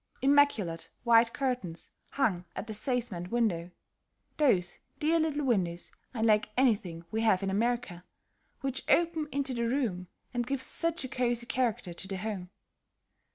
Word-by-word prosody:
Immaculate 270 -12 +3
white 230 -1 +5
curtains 245 - -3 0.2
hung 200 -10 0
at 190 - -4
the 220 - -6
casement 215 -6 -1
windows, 195 -8 0 0.7
those 190 - +2 0.2
dear 325 +2 +3
little 300 -2 0
windows, 180 -8 0 0.2
unlike 220 -3 +2
anything 200 -10 +1
we 220 - 0
have 210 -4 +3
in 195 - 0
America, 215 -4 -1 0.6
which 270 -1 -2
open 330 -3 +3
into 275 -1 -1
the 235 -1 0
room 220 -9 -1 0.3
and 240 -1 -1
give 275 0 -1
such 335 +4 -1
a - - -3
cosy 240 -1 -1
character 235 -8 -1
to 190 - -7
the 195 0 -4
home. 190 -2 -4
235 Hz, 145 wpm, -30 LUFS, 190-265 Hz, 0.7 s, white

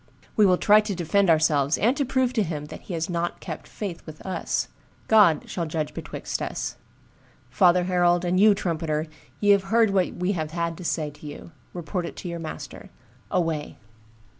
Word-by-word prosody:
We 210 -2 +5
will 180 -1 +4
try 210 +3 +6
to 210 -2 -4
defend 185 +3 +2
ourselves, 155 -3 +3
and 240 +5 +2
to 285 - 0
prove 260 -1 +1
to 220 - +2
him 155 -6 -3
that - - -9
he 180 - -6
has 160 0 -2
not 175 -1 -2
kept - - -7
faith 190 -6 -6
with 155 -1 -9
us. 185 -3 -2 0.4
God 205 -9 +5
shall 170 -3 -3
judge 155 -1 -3
betwixt - - -5
us. - - -4 0.7
Father 175 +7 +4
herald, 175 -1 +2
and 180 +1 +1
you, 210 0 +6
trumpeter, 160 -4 -1 0.3
ye 205 -1 +4
have 200 -1 +4
heard 225 +1 +3
what 190 -2 +1
we 180 +2 0
had 160 -5 -3 0.2
to 180 - -9
say 155 -3 -1
to 150 +1 -12
you; 145 +3 -9 0.2
report 175 0 -4
it - - -9
to - - -7
your 170 -1 -4
master. 160 -1 -8 0.4
Away!" 165 -4 -1
175 Hz, 190 wpm, -25 LUFS, 160-200 Hz, 0.7 s, try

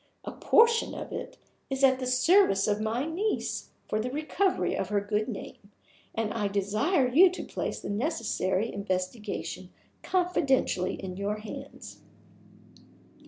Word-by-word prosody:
A - - -4
portion 460 0 +3
of - - -7
it - - -6 0.3
is 270 0 -2
at 260 -1 +5
the 255 - -3
service 255 - +4
of 210 0 +1
my 225 +5 -1
niece 370 +7 -2 0.2
for 215 - -1
the 235 +3 -2
recovery 310 +7 0
of 190 - -2
her 205 -1 +2
good 210 +1 -1
name; 200 -2 -8 0.5
and 220 -1 -1
I 210 -3 0
desire 215 - +1
to 365 +6 +5
place - - -4
the - - -6
necessary 215 - -1
investigation 190 -1 -4 0.3
confidentially 290 - +1
in 185 -1 -7
your 200 +1 -1
hands. 215 0 -9
225 Hz, 135 wpm, -28 LUFS, 200-305 Hz, 0.5 s, at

